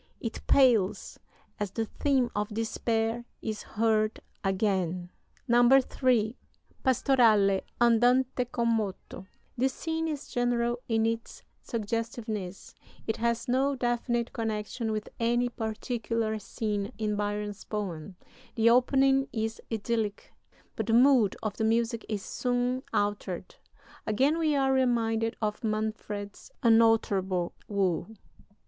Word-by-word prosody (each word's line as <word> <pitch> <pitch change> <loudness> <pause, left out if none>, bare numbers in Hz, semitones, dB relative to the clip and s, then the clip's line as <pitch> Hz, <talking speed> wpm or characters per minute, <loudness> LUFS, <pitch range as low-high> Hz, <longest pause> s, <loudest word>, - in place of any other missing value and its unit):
It 225 -1 -5
pales 235 -8 +3 0.4
as 205 -1 -1
the 225 +4 -2
theme 260 0 0
of 210 +1 -1
despair 225 +1 -1
is 215 -1 -4
heard 215 0 0 0.2
again." 185 -3 0 0.4
III 245 -2 +4 0.5
(Pastorale: 225 -7 +4 0.2
Andante 245 +2 +3
con 235 -1 -1
moto) 205 -4 -3 0.3
This 260 +1 0
scene 325 0 -2
is 295 -2 -4
general 240 0 0
in 225 -1 +2
its 230 0 -3 0.2
suggestiveness; 220 -3 -4 0.3
it 220 - -1
has 235 0 -1
no 270 +3 +2
definite 240 -1 -1
connection 220 0 -3
with 215 -1 -3
any 240 +1 +2
particular 225 -1 -2
scene 205 -1 -3
in 215 -1 -1
Byron's 205 0 -3
poem. 190 -4 -5 0.4
The 230 0 +5
opening 270 +2 +4
is 220 0 -3
idyllic, 220 -1 -2 0.4
but - - -3
the 225 - +1
mood 245 -4 +5
of 215 -2 -3
the - - -1
music 230 +1 0
is 205 -3 -3
soon 250 +1 -1
altered. 205 -3 -2 0.5
Again 270 +9 +2
we 310 -2 +2
are 270 -1 +2
reminded 230 -3 +1
of 210 +1 -2
Manfred's 215 -2 -4
unalterable 210 -6 +3
woe. 190 -5 0
225 Hz, 115 wpm, -28 LUFS, 210-245 Hz, 0.5 s, The